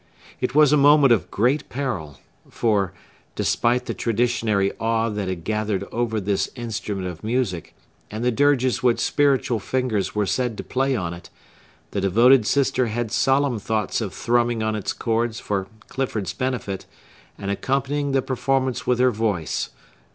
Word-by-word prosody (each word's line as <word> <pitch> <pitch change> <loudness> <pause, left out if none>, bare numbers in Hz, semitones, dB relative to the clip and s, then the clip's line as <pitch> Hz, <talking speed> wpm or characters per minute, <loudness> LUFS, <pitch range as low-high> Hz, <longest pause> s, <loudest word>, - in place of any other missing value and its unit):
It 125 +1 -2
was 150 -1 +6
a - - +5
moment 145 -2 +6
of 115 - -1
great 125 +8 +1
peril; 95 - -4 0.3
for,—despite 115 +3 -1
the - - -3
traditionary 115 -4 +1
awe 115 0 +1
that 105 -2 -3
had 90 -3 -4
gathered 105 -1 -1
over 115 -2 -1
this 100 0 -1
instrument 105 -5 -4
of 90 0 -8
music, 110 -7 -2 0.3
and 110 +2 -5
the 125 - +3
dirges 130 0 +2
which 125 -2 +2
spiritual 135 -5 +2
fingers 115 -3 -1
were 105 -1 +1
said 115 +3 -1
to - - -5
play 135 +1 0
on 85 -6 -2
it,—the 90 +3 -10
devoted 115 +5 +5
sister 130 -3 +2
had 115 0 -3
solemn 135 -1 +2
thoughts 105 0 -1
of - - -3
thrumming 120 -1 +1
on 110 0 0
its 105 - -2
chords 115 -1 -1
for 95 -2 -2 0.2
Clifford's 120 -7 -3
benefit, 125 -7 -3 0.5
and 100 0 -3
accompanying 140 +6 -1
the 135 -1 +1
performance 130 0 -1
with 125 - +3
her 125 +1 +4
voice. 105 -7 -1
115 Hz, 150 wpm, -23 LUFS, 105-130 Hz, 0.5 s, was